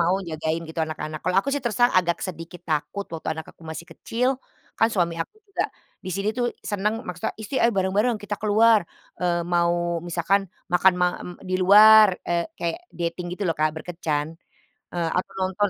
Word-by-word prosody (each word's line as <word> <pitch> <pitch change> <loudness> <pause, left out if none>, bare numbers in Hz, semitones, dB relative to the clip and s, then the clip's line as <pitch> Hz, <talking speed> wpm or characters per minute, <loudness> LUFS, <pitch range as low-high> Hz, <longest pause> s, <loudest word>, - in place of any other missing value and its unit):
mau 170 +2 +3
jagain, 160 +1 -2
gitu, 160 0 -4
anak-anak. 155 0 -5
Kalau 185 +1 +1
aku 275 - -6
sih 285 - 0
terus 235 -3 -1
terang 245 0 +5
agak 170 -1 0
sedikit 175 0 -7
takut 160 +6 -1
waktu 165 - -5
anak 160 - -6
aku - - -39
masih 160 +1 -6
kecil, 245 +3 -1 0.5
kan 225 - +5
suami 170 -3 +1
aku - - -17
juga 395 - -1 0.4
di - - -5
sini 200 +2 -1
tuh 245 - +2 0.2
seneng 205 +1 0
maksudnya 180 -1 -3
isti 220 +5 -4
"Ayo 230 0 +4
bareng-bareng, 205 +5 +2
kita 205 0 -3
keluar," 215 +1 +5 0.4
eee 175 -1 +1
mau 175 -1 +1
misalkan 175 +3 0 0.2
makan 185 +1 +5
ma 180 - +5
m - - -7 0.2
di 185 0 -2
luar, 215 +2 +9 0.2
eee, 170 0 +1
kayak 170 -1 -2 0.2
dating 170 +1 -2
gitu 205 - -5
loh, - - +3
Kak, 155 0 +2
berkencan. 160 -3 -2 0.7
Eee, 170 -2 -1
atau 180 - -2
nonton 190 +2 +1
180 Hz, 185 wpm, -24 LUFS, 170-205 Hz, 0.7 s, luar